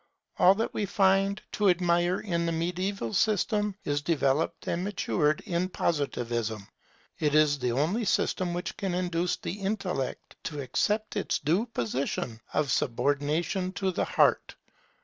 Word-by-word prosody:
All 185 Hz, +2 st, +7 dB
that 225 Hz, +3 st, -2 dB
we 205 Hz, -, -1 dB
find 195 Hz, +1 st, +3 dB
to 205 Hz, -2 st, +2 dB
admire 175 Hz, 0 st, +2 dB
in 170 Hz, -4 st, -1 dB
the -, -, +1 dB
mediaeval 175 Hz, -, -2 dB
system 210 Hz, -1 st, +1 dB
is 145 Hz, 0 st, -1 dB
developed 155 Hz, +1 st, 0 dB
and 170 Hz, +1 st, -1 dB
matured 170 Hz, -6 st, 0 dB
in 180 Hz, -2 st, -1 dB
Positivism. 120 Hz, -, -2 dB, 0.5 s
It 150 Hz, -1 st, +1 dB
is 150 Hz, -2 st, +4 dB
the 125 Hz, -2 st, 0 dB
only 170 Hz, -, 0 dB
system 180 Hz, -3 st, 0 dB
which 175 Hz, -, -4 dB
can 190 Hz, -3 st, -2 dB
induce 180 Hz, -1 st, 0 dB
the 200 Hz, -, -5 dB
intellect 195 Hz, -9 st, -3 dB
to 150 Hz, -3 st, -4 dB
accept 210 Hz, -, -1 dB
its 205 Hz, -, 0 dB
due 175 Hz, -, +1 dB
position 120 Hz, -, -2 dB
of 150 Hz, -4 st, 0 dB
subordination 145 Hz, +10 st, 0 dB
to 195 Hz, -1 st, -1 dB
the -, -, -1 dB
heart. -, -, +2 dB
175 Hz, 145 wpm, -28 LUFS, 145-195 Hz, 0.5 s, All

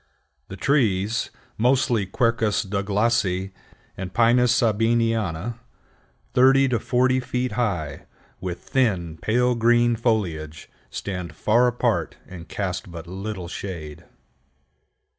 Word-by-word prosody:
The 100 Hz, -, -8 dB
trees, 110 Hz, -4 st, +1 dB, 0.3 s
mostly 120 Hz, -4 st, +2 dB
Quercus 115 Hz, 0 st, +1 dB
Douglasii 100 Hz, -1 st, 0 dB, 0.4 s
and 95 Hz, -1 st, -6 dB
Pinus 120 Hz, +2 st, +4 dB
Sabiniana, 115 Hz, -3 st, +1 dB, 0.7 s
thirty 135 Hz, +2 st, +5 dB
to 120 Hz, -3 st, +1 dB
forty 130 Hz, +3 st, +2 dB
feet 125 Hz, 0 st, -2 dB
high, 90 Hz, -12 st, -2 dB, 0.3 s
with 90 Hz, -2 st, -5 dB
thin, 90 Hz, -11 st, 0 dB
pale 125 Hz, +3 st, +2 dB
green 120 Hz, 0 st, +3 dB
foliage, 90 Hz, -10 st, -2 dB, 0.2 s
stand 90 Hz, -4 st, -5 dB
far 120 Hz, +8 st, +3 dB
apart 120 Hz, 0 st, 0 dB
and 90 Hz, -2 st, -10 dB
cast 95 Hz, -2 st, -3 dB
but 85 Hz, -1 st, -8 dB
little 95 Hz, +1 st, -6 dB
shade. 80 Hz, -5 st, -7 dB
110 Hz, 105 wpm, -23 LUFS, 95-120 Hz, 0.7 s, thirty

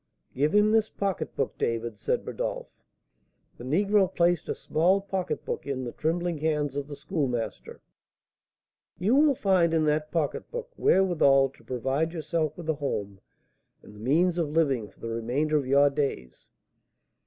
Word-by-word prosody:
"Give 150 Hz, +7 st, +1 dB
him 210 Hz, +1 st, +5 dB
this 220 Hz, -1 st, +3 dB
pocketbook, 195 Hz, -3 st, -3 dB
David," 115 Hz, -2 st, -2 dB
said -, -, -1 dB
Rodolph. -, -, -4 dB, 0.9 s
The -, -, -8 dB
negro 195 Hz, +7 st, +2 dB
placed 175 Hz, -2 st, +1 dB
a -, -, -1 dB
small 180 Hz, +5 st, +2 dB
pocketbook 190 Hz, -6 st, -4 dB
in 135 Hz, -2 st, -2 dB
the 120 Hz, -, -5 dB
trembling 170 Hz, 0 st, -1 dB
hands 150 Hz, -3 st, -1 dB
of 145 Hz, -1 st, -3 dB
the 145 Hz, -, -7 dB
Schoolmaster. 135 Hz, -, -3 dB, 1.2 s
"You 190 Hz, +7 st, +1 dB
will 290 Hz, -1 st, +5 dB
find 180 Hz, -6 st, +2 dB
in 155 Hz, -1 st, +2 dB
that 150 Hz, 0 st, 0 dB
pocketbook 455 Hz, -, -3 dB
wherewithal 145 Hz, -8 st, +4 dB
to 135 Hz, -, -22 dB
provide 135 Hz, +6 st, -1 dB
yourself 160 Hz, -1 st, -2 dB
with 170 Hz, -2 st, -8 dB
a 160 Hz, -, +2 dB
home 100 Hz, -9 st, -4 dB, 0.6 s
and -, -, -14 dB
the 105 Hz, -, -14 dB
means 165 Hz, +9 st, +2 dB
of 160 Hz, -3 st, 0 dB
living 140 Hz, -9 st, +1 dB
for -, -, -26 dB
the 115 Hz, -, -5 dB
remainder 125 Hz, +7 st, -1 dB
of 140 Hz, -4 st, +1 dB
your 140 Hz, +1 st, +5 dB
days. 135 Hz, -, -4 dB
155 Hz, 155 wpm, -27 LUFS, 135-175 Hz, 1.2 s, him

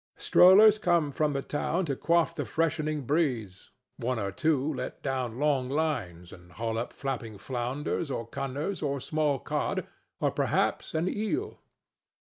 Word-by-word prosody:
Strollers 210 Hz, +4 st, +7 dB
come 170 Hz, -7 st, +2 dB
from 150 Hz, +1 st, 0 dB
the 135 Hz, -1 st, -2 dB
town 165 Hz, +5 st, -1 dB
to 140 Hz, -4 st, -2 dB
quaff 170 Hz, +3 st, +2 dB
the -, -, -3 dB
freshening 155 Hz, -2 st, -1 dB
breeze. 125 Hz, -, -1 dB, 0.3 s
One 125 Hz, 0 st, -1 dB
or 100 Hz, -3 st, -2 dB
two 150 Hz, +5 st, +1 dB
let -, -, -6 dB
down 130 Hz, -4 st, -2 dB
long 140 Hz, -3 st, +1 dB
lines 115 Hz, -, -2 dB
and 90 Hz, -1 st, -15 dB
haul 115 Hz, 0 st, -2 dB
up 120 Hz, -, -4 dB
flapping 120 Hz, -6 st, -5 dB
flounders 130 Hz, -, -3 dB
or 115 Hz, -3 st, -3 dB
cunners 140 Hz, -, -4 dB
or 140 Hz, -2 st, -1 dB
small 150 Hz, +1 st, 0 dB
cod, -, -, -2 dB, 0.3 s
or -, -, +1 dB
perhaps -, -, 0 dB
an 160 Hz, +3 st, +1 dB
eel. 265 Hz, -, -2 dB
140 Hz, 150 wpm, -28 LUFS, 120-160 Hz, 0.3 s, Strollers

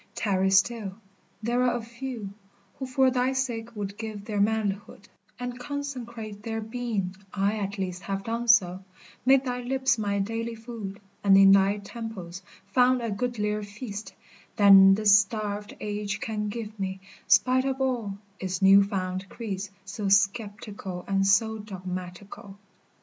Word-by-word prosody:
tarry 190 Hz, -2 st, +1 dB
still, 195 Hz, +1 st, +2 dB, 0.5 s
there 240 Hz, +2 st, +1 dB
are 250 Hz, -1 st, +2 dB
a -, -, -5 dB
few 235 Hz, -3 st, -6 dB, 0.5 s
Who 265 Hz, -, -4 dB
for 260 Hz, 0 st, +3 dB
thy 255 Hz, +1 st, +1 dB
sake 235 Hz, -3 st, -3 dB
would 200 Hz, -1 st, -5 dB
give 215 Hz, -2 st, -6 dB
their 210 Hz, -2 st, -1 dB
manlihood 205 Hz, -1 st, -1 dB, 0.3 s
And 245 Hz, 0 st, -5 dB
consecrate 245 Hz, -6 st, -6 dB
their 225 Hz, +1 st, -3 dB
being, 220 Hz, -4 st, -3 dB, 0.2 s
I 200 Hz, +2 st, 0 dB
at 200 Hz, 0 st, -3 dB
least 185 Hz, -1 st, -3 dB
Have 195 Hz, 0 st, -4 dB
done 230 Hz, +2 st, -3 dB
so, 190 Hz, -5 st, +4 dB, 0.4 s
made 270 Hz, 0 st, +5 dB
thy 250 Hz, -1 st, -2 dB
lips 260 Hz, -1 st, +1 dB
my 200 Hz, -1 st, 0 dB
daily 225 Hz, +3 st, -2 dB
food, 225 Hz, -4 st, -7 dB, 0.2 s
And 195 Hz, -1 st, +6 dB
in 195 Hz, 0 st, +8 dB
thy 195 Hz, +1 st, +4 dB
temples 200 Hz, -4 st, -7 dB, 0.2 s
found 250 Hz, +5 st, +3 dB
a 230 Hz, -, -2 dB
goodlier 210 Hz, -1 st, -1 dB
feast 205 Hz, -1 st, -7 dB, 0.4 s
Than 195 Hz, -1 st, +8 dB
this 205 Hz, -1 st, +6 dB
starved 210 Hz, 0 st, -3 dB
age 210 Hz, 0 st, -3 dB
can 210 Hz, -1 st, -3 dB
give 215 Hz, -1 st, -6 dB
me, 190 Hz, 0 st, -3 dB, 0.3 s
spite 260 Hz, +1 st, +4 dB
of 265 Hz, 0 st, -1 dB
all 240 Hz, -7 st, -1 dB, 0.2 s
Its 185 Hz, -1 st, -3 dB
new 195 Hz, +1 st, +7 dB
found 190 Hz, -1 st, -3 dB
creeds 205 Hz, -4 st, -5 dB, 0.2 s
so 200 Hz, +1 st, -3 dB
sceptical 200 Hz, -2 st, 0 dB
and 195 Hz, 0 st, +2 dB
so 220 Hz, +3 st, +3 dB
dogmatical. 185 Hz, 0 st, -8 dB
210 Hz, 150 wpm, -27 LUFS, 195-235 Hz, 0.5 s, in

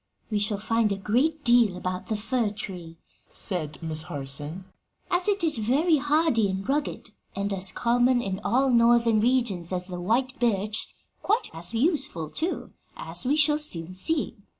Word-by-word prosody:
"We 210 Hz, -, +1 dB
shall 205 Hz, 0 st, 0 dB
find 220 Hz, +1 st, +1 dB
a 200 Hz, -, -1 dB
great 270 Hz, +11 st, 0 dB
deal 235 Hz, -7 st, +4 dB
about 185 Hz, 0 st, -4 dB
the 215 Hz, -, -1 dB
fir 230 Hz, +1 st, 0 dB
tree," 180 Hz, -5 st, -8 dB, 0.3 s
said 155 Hz, -6 st, -3 dB
Miss 160 Hz, -1 st, -3 dB
Harson, 145 Hz, +4 st, -6 dB, 0.5 s
"as 355 Hz, +1 st, +2 dB
it 405 Hz, -3 st, +2 dB
is 310 Hz, -8 st, +2 dB
very 290 Hz, +9 st, +3 dB
hardy 290 Hz, -7 st, +2 dB
and 190 Hz, +2 st, -4 dB
rugged, 290 Hz, +2 st, -2 dB, 0.2 s
and 200 Hz, 0 st, -2 dB
as 190 Hz, -1 st, +2 dB
common 245 Hz, +3 st, +2 dB
in 195 Hz, -5 st, -3 dB
all 260 Hz, +4 st, +2 dB
Northern 235 Hz, -1 st, +4 dB
regions 220 Hz, -7 st, 0 dB
as 180 Hz, -1 st, -1 dB
the 180 Hz, -1 st, -6 dB
white 255 Hz, +8 st, 0 dB
birch 215 Hz, -2 st, -1 dB, 0.3 s
quite 440 Hz, +3 st, 0 dB
as 170 Hz, +7 st, 0 dB
useful, 270 Hz, -, -1 dB
too, 335 Hz, +4 st, -3 dB, 0.3 s
as -, -, -1 dB
we 285 Hz, -, +3 dB
shall 300 Hz, 0 st, +3 dB
soon 180 Hz, -, -2 dB
see. 285 Hz, -, 0 dB
225 Hz, 165 wpm, -26 LUFS, 185-270 Hz, 0.5 s, deal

